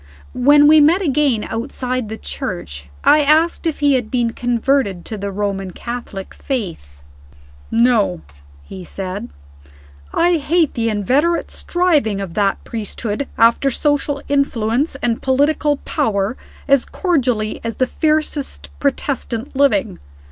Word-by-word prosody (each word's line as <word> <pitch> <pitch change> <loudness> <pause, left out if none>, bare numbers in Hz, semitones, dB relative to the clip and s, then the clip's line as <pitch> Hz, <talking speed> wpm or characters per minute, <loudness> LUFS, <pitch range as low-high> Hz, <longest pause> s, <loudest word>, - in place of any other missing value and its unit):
When 290 +4 +5
we 305 +1 +7
met 335 +7 +4
again 275 -7 +1
outside 250 0 -3
the 220 - -5
church, 80 - -5
I 300 - +6
asked 315 +4 +2
if 310 -2 -3
he 285 -1 +4
had 245 -4 0
been 240 -2 0
converted 240 -6 0
to 220 - -5
the 200 -1 -4
Roman 195 -1 -2
Catholic 230 -2 -7
faith. 165 - -5 0.7
"No," 230 - +2 0.4
he 185 - -9
said. 190 +2 -6 0.8
"I 345 0 +3
hate 320 +1 +1
the 230 -1 0
inveterate 265 - +1
striving 305 - +1
of 195 -4 -5
that 200 0 0
priesthood 220 +3 -4
after 230 +4 +4
social 290 +1 0
influence 275 0 0
and 230 -1 0
political 290 +2 +2
power 220 -6 0 0.3
as 275 -2 +4
cordially 250 - -1
as 230 -1 -3
the 255 - +1
fiercest 305 0 -1
Protestant 270 -3 -2
living. 275 -5 +2
250 Hz, 125 wpm, -18 LUFS, 215-290 Hz, 0.8 s, we